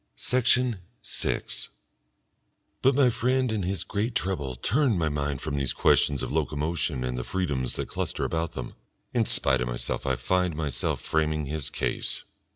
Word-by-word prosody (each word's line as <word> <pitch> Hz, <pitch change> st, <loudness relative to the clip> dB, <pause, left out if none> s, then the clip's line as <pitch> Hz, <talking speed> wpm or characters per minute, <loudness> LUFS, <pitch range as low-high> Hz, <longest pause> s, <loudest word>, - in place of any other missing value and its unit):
Section 125 Hz, -3 st, +2 dB, 0.2 s
6 -, -, -1 dB, 1.1 s
But 135 Hz, 0 st, +4 dB
my 130 Hz, -3 st, +5 dB
friend 130 Hz, +1 st, +1 dB
and 105 Hz, -3 st, -1 dB
his 95 Hz, +2 st, -1 dB
great 110 Hz, +3 st, -2 dB
trouble 70 Hz, -9 st, -1 dB
turn 120 Hz, -, +2 dB
my 80 Hz, -2 st, +1 dB
mind 75 Hz, -2 st, -2 dB
from 75 Hz, -2 st, -2 dB
these 70 Hz, -2 st, 0 dB
questions 70 Hz, -3 st, +3 dB
of -, -, -3 dB
locomotion 75 Hz, -2 st, 0 dB
and 60 Hz, 0 st, -2 dB
the -, -, -2 dB
freedoms 70 Hz, -7 st, -1 dB
that -, -, -3 dB
cluster -, -, -2 dB
about 80 Hz, 0 st, -1 dB
them. 65 Hz, -4 st, -5 dB, 0.4 s
In -, -, +3 dB
spite 65 Hz, -2 st, +3 dB
of 60 Hz, -, 0 dB
myself -, -, -3 dB
I 65 Hz, -, +2 dB
find 90 Hz, +3 st, +1 dB
myself 75 Hz, -3 st, -1 dB
framing 80 Hz, -1 st, 0 dB
his 75 Hz, 0 st, -2 dB
case. -, -, -1 dB
80 Hz, 160 wpm, -27 LUFS, 70-100 Hz, 1.1 s, my